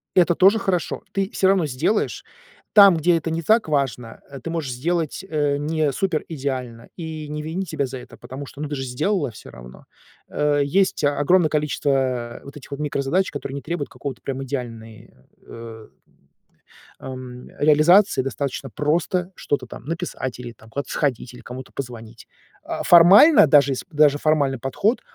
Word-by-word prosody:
Это 175 -1 +5
тоже 195 +4 +5
хорошо. 180 -4 -2
Ты 195 -1 -1
сё 190 - +2
равно 185 -6 +2
сделаешь. 140 - -1 0.5
Там, 200 -5 +8
где 170 +2 +3
это 165 0 -4
не 165 - -2
так 215 +4 +2
важно, 130 -5 -2
э, 140 -1 -9
ты 150 - -7
можешь 160 -6 -3
сделать, 165 +5 -2
э, 145 -4 0
не 155 0 0
супер 165 +2 -1
идеально 130 -6 -5
и 160 -2 -6
не 150 0 -4
винить 165 +3 -4
себя 145 -3 -1
за 130 +1 -7
это, 125 - -13
потому 135 +2 -8
что, 140 - -11
ну, 150 - -3
ты 145 - -3
же 135 - -4
сделала 145 +5 -1
все 110 - -13
равно. - - -13 0.4
Э, 145 -1 +1
есть 185 +4 +1
огромное 145 +4 +3
количество, 150 -1 -1
э, 125 -3 -2
вот 140 - -12
этих 140 - -14
вот 140 - -5
микрозадач, 150 +5 -1
которые 140 -1 -6
не 140 - -5
требуют 165 -3 -4
какого-то 140 -4 -7
прям 135 0 -4
идеальный, 115 -4 -7 0.4
э 115 -1 -10 1.1
ам, 130 -1 -9
э, - - -4
реализации. 155 0 +5
Достаточно 135 +1 -4
просто 175 - -1
что-то 145 - -2
там - - -11
написать 160 -6 -5
или 120 -1 -7
там 110 0 -19
куда-то 140 +4 -5
сходить, 125 -4 -2
или 125 - -12
кому-то 125 +1 -9
позвонить. 115 -3 -8 0.4
А, - - -4
формально, 185 - +8
даже 140 -2 +4
сп 130 - -7
даже 150 -2 +4
формальный 145 -4 +1
подход, 195 - 0
145 Hz, 175 wpm, -22 LUFS, 130-165 Hz, 1.1 s, Там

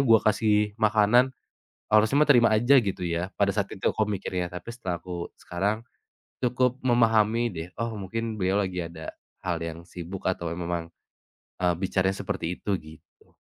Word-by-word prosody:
gua 115 -4 +6
kasih 105 -1 +2
makanan, 110 +3 +4 0.6
harusnya 110 +4 +4
mah 150 - +2
terima 120 -4 +7
aja 120 +5 +5
gitu 100 -5 -1
ya." 85 +2 -2
Pada 100 -1 +2
saat 100 0 0
itu 95 - -15
aku 110 - 0
mikirnya, 95 -3 -2
tapi 90 +6 -8
setelah 95 -8 -4
aku 90 -1 -5
sekarang, 100 +6 -2 0.6
cukup 125 +1 +1
memahami 115 -2 +3
deh, 80 0 -6
"Oh 115 0 -2
mungkin 110 +2 -4
beliau 95 +2 +2
lagi 90 -1 -3
ada, 80 -1 -8 0.3
hal - - -1
yang 85 0 -6
sibuk 90 +1 -8
atau 85 -2 -1
memang, 85 -1 -3 0.7
eee, 90 -1 +2
bicaranya 95 +1 0
seperti 85 +2 -3
itu," 100 - -4
gitu. 80 0 -18
100 Hz, 160 wpm, -26 LUFS, 90-115 Hz, 0.7 s, terima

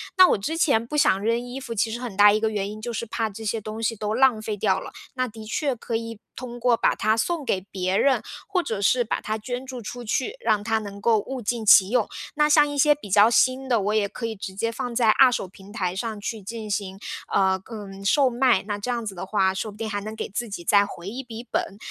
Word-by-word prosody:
那 370 -1 +8
我 - - +3
之 295 +12 -3
前 255 -9 +2
不 270 - -6
想 290 -9 +4
扔 230 +2 +2
衣 245 +2 -7
服， 245 -3 -6
其 225 +1 0
实 235 - -4
很 240 -6 -6
大 205 +1 +7
一 215 - +2
个 220 0 0
原 200 -2 -2
因， 210 +1 -8
就 235 +2 -5
是 230 +1 -4
怕 220 -1 -2
这 220 +3 -9
些 220 +1 -1
东 215 +1 -7
西 225 0 0
都 210 0 -3
浪 250 -1 +4
费 215 -1 -3
掉 195 -2 +1
了， - - -9 0.2
那 255 0 0
的 220 -1 -10
确 270 +4 -1
可 230 0 -5
以 225 - -1 0.3
通 240 -1 -7
过 245 0 +3
把 - - +2
它 215 +1 +2
送 300 +7 -1
给 190 -6 0
别 185 -1 -1
人， 275 +3 +3 0.3
或 375 -2 +1
者 220 - -4
是 245 +5 +3
把 - - -2
它 215 +1 -2
捐 245 +4 -5
助 255 -2 -7
出 245 +3 -7
去， 255 - -1
让 215 - +2
它 225 0 +1
能 200 -1 -8
够 225 +1 +3
物 255 +5 -5
尽 230 0 -2
其 195 -2 +7
用。 240 -2 +2 0.3
那 300 0 +3
像 295 -1 +6
一 290 0 -5
些 295 +1 +5
比 280 -8 -11
较 205 +3 +6
新 255 +2 +2
的， 235 -3 +3
我 205 +2 0
也 210 -2 +2
可 230 - -6
以 225 -1 -3
直 195 -1 -7
接 215 +4 -1
放 240 +1 -4
在 230 -2 +3
二 255 +3 +6
手 195 - -2
平 195 +2 -15
台 185 -5 -2
上 220 +1 -4
去 215 +1 -5
进 220 +2 -7
行， 195 -1 -3 0.3
呃， 190 -1 +2
嗯， 195 -3 -8
售 265 +7 +4
卖， 245 -4 +3
那 205 -1 -2
这 205 +5 -3
样 235 -2 -2
子 200 -3 -5
的 180 - -5
话， 190 -1 +1
说 210 +3 -4
不 205 - -15
定 220 0 -4
还 205 -1 -3
能 215 +2 -6
给 - - -4
自 225 +3 -4
己 185 -3 -6
再 200 +2 +5
回 180 -3 -9
一 245 +6 -5
笔 235 -1 -8
本。 195 - -2
220 Hz, 290 characters per minute, -24 LUFS, 205-245 Hz, 0.3 s, 那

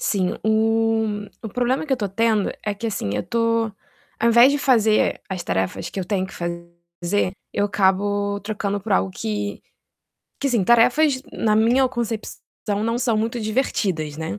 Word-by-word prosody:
Sim, 185 -3 0
o 220 -1 +1 0.2
o 220 - -5
problema 250 +6 0
que 290 - -2
eu - - +6
estou 205 -4 -2
tendo 215 +1 +1
é 210 - 0
que, 205 +3 -5
assim, 200 - -2
eu 105 - 0
estou 230 - 0 0.5
ao 235 - +3
invés 235 +4 +7
de 285 - 0
fazer 225 -6 +3
as 185 -2 -4
tarefas 95 +1 -2
que - - -6
eu 190 - -2
tenho 190 0 -1
que - - -9
fazer 170 +2 -3 0.2
eu 205 - +1
acabo 200 +1 +1
trocando 205 -1 -3
por 205 +1 -3
algo 190 0 +2
que 205 0 -4 0.8
que 280 - -1
assim, 235 -6 +2
tarefas, 255 +6 +4
na 215 -1 +1
minha 245 +4 +4
concepção, 235 -3 -4 0.4
não 230 +1 0
são 240 -3 +1
muito 225 +2 -1
divertidas, 195 - -1
né. 160 -11 -4
215 Hz, 170 wpm, -22 LUFS, 190-230 Hz, 0.8 s, invés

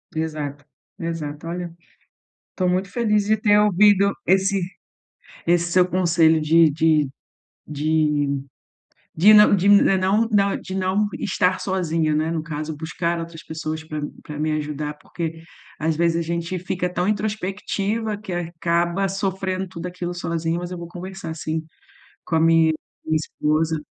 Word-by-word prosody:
Exato, 150 -3 -3 0.3
exato. 165 -2 -5
Olha, 175 0 -5 0.8
tô 185 - 0
muito 185 +2 0
feliz 210 -3 +1
de 215 +1 +2
ter 210 0 +4
ouvido 205 0 +5
esse 190 +1 +2 0.9
esse 175 0 +2
seu 180 0 +4
conselho 170 -3 +3
de 160 +2 +5
de 155 -1 +2 0.6
de 150 0 +1 0.9
de 200 +7 +7
não 210 -1 +7
de 195 +2 +1
não 200 +2 +4
não 200 -2 +2
de 190 - -7
não 190 +2 +1
estar 185 -6 +1
sozinha, 165 -5 0
né, 155 +2 0
no 165 -1 -2
caso. 155 0 -5
Buscar 170 +2 -2
outras 165 -1 -7
pessoas 160 0 -5
para 155 -1 -5 0.2
para 150 -1 -8
me 155 +1 0
ajudar, 150 0 -3
porque, 165 0 -6 0.4
às 160 0 0
vezes, 170 0 +2
a - - 0
gente 170 +2 -3
fica 180 0 -2
tão 180 +1 0
introspectiva 210 +1 -2
que 210 -3 -8
acaba 170 +2 0
sofrendo 190 -1 -2
tudo 175 -1 -7
aquilo 180 0 -4
sozinha. 170 -1 -2
Mas 175 0 -5
eu 180 - -6
vou 170 -1 -7
conversar, 180 -1 -7
sim, 160 0 -3 0.6
com 165 - -2
a - - +4
mi-minha 165 0 +4 0.4
esposa. 155 0 0
170 Hz, 145 wpm, -22 LUFS, 160-190 Hz, 0.9 s, de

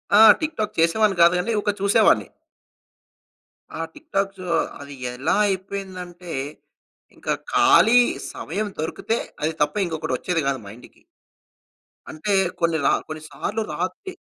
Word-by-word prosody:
ఆ! 215 - +8 0.2
టిక్‌టాక్ 260 -9 -3
చేసేవాడిని 195 +4 +3
కాదు 170 +1 +7
గాని 225 +5 -1
ఒక 205 - -1
చూసేవాడిని. 200 +1 +4 1.5
ఆ - - -1
టిక్ - - -17
టాక్సు 195 -1 -1 0.4
అది 140 0 -9 0.2
ఎలా 130 +3 0
అయిపోయిందంటే, 185 -2 -5 0.8
ఇంకా - - -2 0.2
ఖాళీ 390 - +6 0.3
సమయం 205 +7 -3
దొరికితే 195 +8 -2 0.3
అది 160 +1 0
తప్ప 150 0 +1
ఇంకొకటి 160 -5 -3
వచ్చేది 175 +2 -1
కాదు 135 -2 0
మైండ్‌కి. 110 +5 -13 1.1
అంటే 200 +7 -2 0.3
కొన్ని 170 -1 +1
రా - - +5 0.2
కొన్ని 155 0 -7
సార్లు 220 +3 -3
రాత్రి 185 - -4
185 Hz, 120 wpm, -23 LUFS, 160-210 Hz, 1.5 s, ఆ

